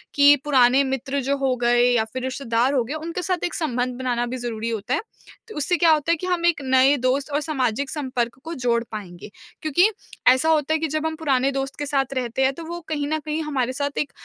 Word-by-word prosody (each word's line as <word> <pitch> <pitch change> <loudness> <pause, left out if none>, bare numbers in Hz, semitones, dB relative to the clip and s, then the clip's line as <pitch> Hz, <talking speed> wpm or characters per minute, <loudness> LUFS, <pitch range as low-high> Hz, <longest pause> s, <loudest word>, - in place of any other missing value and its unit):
कि 285 0 +7
पुराने 265 -1 +4
मित्र 270 +1 -2
जो 280 +2 0
हो 270 -2 0
गए 240 0 +4
या 235 -2 +3
फिर 255 0 -4
रिश्तेदार 260 0 0
हो 255 -4 +2
गए, 255 - -6
उनके 330 +3 -4
साथ 360 0 -2
एक 350 - -2
संबंध 250 -6 -1
बनाना 245 -2 -1
भी 250 +2 -4
ज़रूरी 230 -2 -4
होता 220 -3 -3
है। - - +1 0.5
तो - - -9
उससे 300 +5 +1
क्या 335 -2 +5
होता 310 +1 +2
है - - +4
कि 365 - -5
हम 355 -2 0
एक 340 -4 +2
नए 265 +2 +4
दोस्त 260 +3 0
और 290 - +1
सामाजिक 270 -4 -1
संपर्क 255 -5 -3
को 330 - -6
जोड़ 240 -5 0
पाएँगे 195 -3 -8 0.3
क्योंकि 330 +7 +3 0.4
ऐसा 260 +5 +4
होता 310 -1 +2
है 320 - +1
कि 320 - -1
जब 310 +1 -2
हम 320 0 -1
पुराने 275 -4 +1
दोस्त 270 0 -3
के 290 - -2
साथ 275 -1 0
रहते 255 0 -1
हैं, 265 +1 +2
तो 335 - -9
वो 345 +1 -5
कहीं 290 -2 -2
न 310 +1 -1
कहीं 310 +1 -2
हमारे 260 -4 -1
साथ 285 +1 -3
एक 290 - -1
275 Hz, 240 wpm, -23 LUFS, 250-310 Hz, 0.5 s, कि